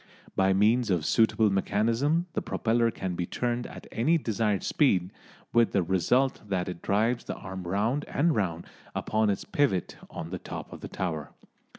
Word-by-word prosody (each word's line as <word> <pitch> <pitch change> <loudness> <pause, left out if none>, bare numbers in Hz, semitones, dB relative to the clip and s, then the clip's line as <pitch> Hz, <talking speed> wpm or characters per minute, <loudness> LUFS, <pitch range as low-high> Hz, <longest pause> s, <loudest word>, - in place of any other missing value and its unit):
By 95 0 +3
means 110 +5 +3
of 85 -5 +1
suitable 110 -2 +3
mechanism 115 - +1
the - - -1
propeller 115 +1 +1
can 95 -4 -4
be 85 0 -3
turned 120 0 -2
at - - -10
any 155 +9 +2
desired 110 -7 0
speed, 95 - +2 0.4
with 115 -1 +4
the 95 - +3
result 95 +10 +2
that 95 -2 -1
it 90 -2 -6
drives 115 +5 +1
the - - -4
arm 95 -2 -7
round 110 +10 0
and 160 +2 +1
round 85 -5 -1 0.3
upon 110 -1 +1
its 100 - -1
pivot 130 - 0
on - - -7
the - - -4
top - - -7
of - - -10
the - - -6
tower. 80 -6 -4
105 Hz, 175 wpm, -28 LUFS, 95-120 Hz, 0.4 s, with